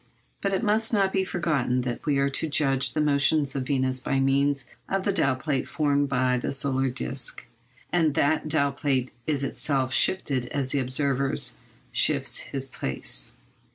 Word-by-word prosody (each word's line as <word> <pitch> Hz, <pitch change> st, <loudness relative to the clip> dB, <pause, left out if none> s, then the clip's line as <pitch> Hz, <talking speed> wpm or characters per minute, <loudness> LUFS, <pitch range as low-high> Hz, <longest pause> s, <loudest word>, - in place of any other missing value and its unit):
But 195 Hz, -, 0 dB
it 195 Hz, +3 st, 0 dB
must 220 Hz, +1 st, +1 dB
not 195 Hz, -3 st, +2 dB
be 190 Hz, -, +2 dB
forgotten 150 Hz, -9 st, 0 dB
that 125 Hz, +2 st, -5 dB
we 145 Hz, -2 st, +2 dB
are 140 Hz, 0 st, +2 dB
to 150 Hz, +3 st, -2 dB
judge 135 Hz, -3 st, +2 dB
the 155 Hz, -, 0 dB
motions 145 Hz, -1 st, +2 dB
of 130 Hz, -2 st, -2 dB
Venus 130 Hz, -2 st, +1 dB
by 135 Hz, 0 st, 0 dB
means 140 Hz, +1 st, +2 dB, 0.2 s
of 195 Hz, 0 st, 0 dB
the 200 Hz, -, 0 dB
dial 135 Hz, -8 st, +2 dB
plate 135 Hz, 0 st, -2 dB
formed 145 Hz, -2 st, +1 dB
by 125 Hz, -1 st, +1 dB
the -, -, -3 dB
solar 135 Hz, -1 st, +1 dB
disc, 130 Hz, +1 st, -2 dB, 0.5 s
and 160 Hz, -4 st, +2 dB
that 155 Hz, 0 st, +1 dB
dial 140 Hz, -2 st, +2 dB
plate 135 Hz, -2 st, -1 dB, 0.2 s
is 145 Hz, -3 st, 0 dB
itself 135 Hz, -1 st, -1 dB
shifted 135 Hz, -9 st, +2 dB
as 140 Hz, -2 st, -2 dB
the 140 Hz, -, 0 dB
observer 135 Hz, +1 st, 0 dB, 0.6 s
shifts -, -, +2 dB
his 135 Hz, -1 st, -1 dB
place. 65 Hz, -, -2 dB
140 Hz, 170 wpm, -26 LUFS, 130-155 Hz, 0.6 s, not